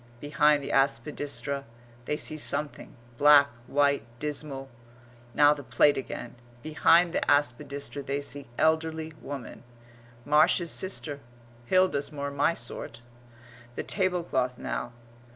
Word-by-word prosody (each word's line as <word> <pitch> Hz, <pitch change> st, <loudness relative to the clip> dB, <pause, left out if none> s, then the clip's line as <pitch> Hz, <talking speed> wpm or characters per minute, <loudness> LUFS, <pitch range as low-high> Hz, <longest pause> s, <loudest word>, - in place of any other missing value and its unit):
Behind 150 Hz, +1 st, +2 dB
the -, -, -4 dB
aspidistra 140 Hz, +1 st, -1 dB, 0.4 s
they 150 Hz, -, -1 dB
see 155 Hz, -, -3 dB
something: 150 Hz, -1 st, -3 dB, 0.2 s
black, 145 Hz, -1 st, +7 dB, 0.2 s
white, 140 Hz, 0 st, +2 dB
dismal; 145 Hz, -1 st, -4 dB, 0.7 s
now 145 Hz, 0 st, +6 dB
the 145 Hz, -, -8 dB
plate 145 Hz, +2 st, +3 dB
again; 125 Hz, -2 st, -6 dB, 0.3 s
behind 165 Hz, +2 st, +3 dB
the -, -, 0 dB
aspidistra 140 Hz, 0 st, 0 dB
they 140 Hz, +1 st, -3 dB
see 145 Hz, 0 st, -6 dB
elderly 160 Hz, 0 st, 0 dB
woman; 140 Hz, -4 st, -8 dB, 0.6 s
"Marsh's 160 Hz, +3 st, +3 dB
sister, 155 Hz, -6 st, -2 dB, 0.5 s
Hilda's 185 Hz, -5 st, +2 dB
more 140 Hz, -1 st, -4 dB
my 145 Hz, +4 st, +1 dB
sort;" 115 Hz, 0 st, -6 dB, 0.7 s
the -, -, -3 dB
tablecloth 175 Hz, -10 st, 0 dB
now. 120 Hz, -, -4 dB
145 Hz, 115 wpm, -27 LUFS, 140-155 Hz, 0.7 s, black